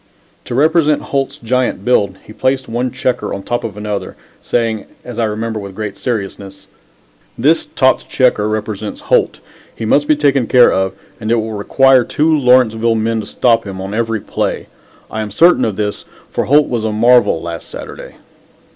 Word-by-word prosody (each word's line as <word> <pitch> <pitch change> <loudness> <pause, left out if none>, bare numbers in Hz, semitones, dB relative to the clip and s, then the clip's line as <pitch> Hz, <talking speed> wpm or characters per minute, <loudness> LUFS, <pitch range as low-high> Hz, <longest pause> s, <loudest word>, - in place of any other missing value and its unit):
To - - -4
represent 155 +1 +3
Holt's 140 0 -2
giant 125 -5 -1
build 100 -6 +2
he 105 - -12
placed 130 +2 -1
one 120 +3 -2
checker 130 -1 -2
on 100 - -7
top 120 - -2
of 105 -3 -6
another, 105 -1 -4 0.3
saying, 115 -3 -1 0.2
as 120 -1 -7
I 115 - +2
remember, 110 +1 -3
with 100 -2 -8
great 105 -1 -5
seriousness: 100 -4 -5 0.7
"This 150 +8 +2
topped 130 -1 +1
checker 125 -5 +2
represents 110 -1 -4
Holt. - - +1 0.3
He 115 - -5
must 145 +6 +2
be 155 - +4
taken 140 -4 +1
care 125 -1 +5
of, 95 0 0 0.3
and 110 -1 -4
it 120 - +3
will 110 -1 -2
require 130 +5 +4
two 155 +6 +1
Lawrenceville 120 -4 +3
men 110 +1 0
to 110 - -6
stop 115 -2 +2
him 95 -1 -6
on 95 +1 -5
every 115 -1 -1
play. - - -3 0.5
I 110 - -3
am 105 - -4
certain 170 - +4
of 110 -3 -2
this 105 0 -3 0.3
for - - -1
Holt 145 +2 +4
was 120 -3 -2
a 110 - -1
marvel 120 -3 +4
last 85 0 -7
Saturday." - - -9
115 Hz, 180 wpm, -16 LUFS, 105-130 Hz, 0.7 s, care